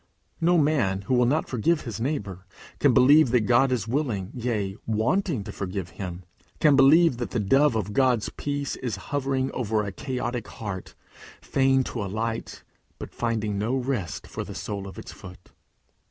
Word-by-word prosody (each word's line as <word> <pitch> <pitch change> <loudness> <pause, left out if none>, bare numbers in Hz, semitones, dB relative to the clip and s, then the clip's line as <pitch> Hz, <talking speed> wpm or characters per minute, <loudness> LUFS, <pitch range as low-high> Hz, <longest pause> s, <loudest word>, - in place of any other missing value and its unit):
No 175 +2 +4
man 135 - +2
who 100 - -2
will 125 -1 +4
not 150 +5 +1
forgive 150 +7 +1
his 115 -3 -6
neighbour, 100 - -3 0.3
can 140 - +5
believe 135 +3 +6
that 125 0 +3
God 125 +5 +3
is 115 -5 -1
willing, 115 -7 -2
yea, 110 -6 -2
wanting 115 - 0
to 105 - -7
forgive 95 -2 -4
him, 90 -2 -7 0.4
can 150 -2 +5
believe 145 +1 +6
that 120 -4 -3
the 115 - -2
dove 135 +6 +3
of 105 -2 -2
God's 125 -3 +2
peace 145 -1 -3
is 125 -4 -3 0.2
hovering 135 -1 0
over 110 -3 -1
a 100 - -4
chaotic 125 0 -4
heart, 100 -4 -7 0.4
fain 135 -1 +2
to 115 -3 -4
alight, 110 +3 -4 0.3
but - - -9
finding 110 -3 -1
no 115 +5 0
rest 125 - -3
for - - -5
the - - -9
sole 100 -2 -5
of 95 - -10
its - - -8
foot. 90 0 -13
120 Hz, 170 wpm, -25 LUFS, 100-135 Hz, 0.4 s, believe